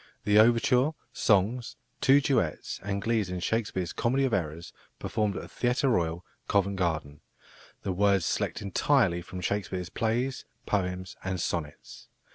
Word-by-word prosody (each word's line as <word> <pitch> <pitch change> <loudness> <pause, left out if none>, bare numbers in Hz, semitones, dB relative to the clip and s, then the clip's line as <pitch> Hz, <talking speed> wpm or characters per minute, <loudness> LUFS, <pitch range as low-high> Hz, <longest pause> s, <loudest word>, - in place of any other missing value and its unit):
"The 105 +1 +5
overture, 125 +5 +4 0.2
songs, 110 +4 +1 0.3
two 140 +2 +6
duets, 125 - -1
and 100 0 -3
glees 110 -4 +1
in 90 0 -3
Shakespeare's 95 -2 -1
Comedy 130 +4 +1
of 130 - -1
Errors, 85 -2 -3 0.2
performed 105 -2 -1
at - - -4
the - - -9
Theatre 125 +3 0
Royal, 85 -5 0 0.2
Covent 100 0 +1
Garden; 80 -5 -2 0.6
the 95 - -1
words 100 -1 +3
selected - - -1
entirely 100 -2 +2
from 90 +1 -8
Shakespeare's 90 -2 -2
Plays, 120 +3 -1 0.2
Poems, 90 -2 -2
and 95 -1 -2
Sonnets. 75 -3 -5
100 Hz, 140 wpm, -28 LUFS, 90-115 Hz, 0.6 s, two